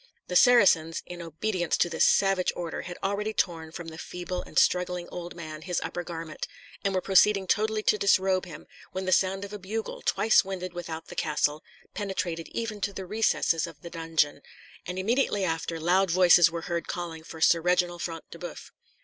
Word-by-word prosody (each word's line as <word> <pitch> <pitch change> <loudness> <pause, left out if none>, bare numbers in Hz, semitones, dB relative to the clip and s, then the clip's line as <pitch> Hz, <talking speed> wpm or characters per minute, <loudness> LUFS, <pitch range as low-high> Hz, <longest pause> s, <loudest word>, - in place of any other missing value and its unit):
The 180 - -3
Saracens, 180 -9 +5
in 175 -1 -8
obedience 175 +2 -1
to - - +3
this 165 -1 +3
savage 195 -2 +3
order, 170 -2 -4
had 175 0 -8
already 205 +2 -1
torn 165 -3 -1
from 170 0 -7
the 160 0 -10
feeble 180 +1 -5
and - - -10
struggling 180 -1 +2
old 175 0 -7
man 155 -2 -8
his 180 +1 -2
upper 175 - -4
garment, 165 -2 -6 0.4
and 195 -1 0
were 185 - +1
proceeding 195 +1 +4
totally 215 +2 +1
to 210 - +2
disrobe 190 -1 +3
him, 155 -3 -10 0.3
when 190 +1 -3
the 185 - -1
sound 195 +2 +2
of 200 - -10
a 210 - -6
bugle, 215 +4 -5
twice 220 - +4
winded 185 -2 -5
without 165 -2 -6
the - - -9
castle, 150 -1 0 0.3
penetrated 185 -5 -3
even 225 -3 -4
to 200 - -1
the 190 -1 -6
recesses 180 -5 +1
of 160 -3 -13
the 170 - -8
dungeon; 160 -3 0 0.5
and 180 +1 -4
immediately 205 0 +1
after, 165 -1 -2
loud 180 +4 +3
voices 175 -1 +6
were 165 0 -5
heard 170 -1 -3
calling 165 -2 -5
for 160 - -10
Sir 165 +1 +4
Reginald 175 0 +1
Front 165 -2 -5
de - - -10
Boeuf. - - -8
180 Hz, 190 wpm, -27 LUFS, 165-195 Hz, 0.5 s, voices